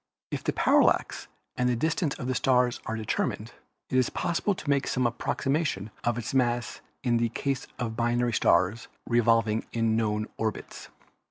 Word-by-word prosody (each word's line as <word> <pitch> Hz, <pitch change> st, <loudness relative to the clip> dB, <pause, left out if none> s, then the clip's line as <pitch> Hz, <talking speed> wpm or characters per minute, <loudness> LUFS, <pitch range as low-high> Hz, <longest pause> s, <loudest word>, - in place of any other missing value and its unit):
If -, -, -3 dB
the -, -, +1 dB
parallax -, -, +2 dB, 0.3 s
and 125 Hz, -1 st, +1 dB
distance 160 Hz, 0 st, 0 dB
of 125 Hz, -, -5 dB
a 130 Hz, -, 0 dB
star 125 Hz, -1 st, +3 dB, 0.2 s
are 110 Hz, -, -2 dB
determined, 110 Hz, -1 st, -2 dB, 0.4 s
it 130 Hz, -, +3 dB
is 125 Hz, -, +2 dB
possible 175 Hz, +4 st, -1 dB
to 155 Hz, -, -10 dB
make 140 Hz, -1 st, +2 dB
some 130 Hz, -1 st, 0 dB
approximation 120 Hz, -, -1 dB
of 120 Hz, -1 st, 0 dB
its 120 Hz, +1 st, -4 dB
mass 120 Hz, -2 st, 0 dB, 0.2 s
in 120 Hz, -2 st, +2 dB
the 115 Hz, 0 st, +1 dB
case 135 Hz, +3 st, -2 dB
of 115 Hz, -2 st, -3 dB
binary 120 Hz, +1 st, +1 dB
stars 95 Hz, +4 st, +2 dB, 0.2 s
revolving 115 Hz, -2 st, +2 dB
in 115 Hz, -1 st, +1 dB
known 110 Hz, -1 st, 0 dB
orbits. 110 Hz, -3 st, -4 dB
120 Hz, 160 wpm, -27 LUFS, 115-130 Hz, 0.4 s, star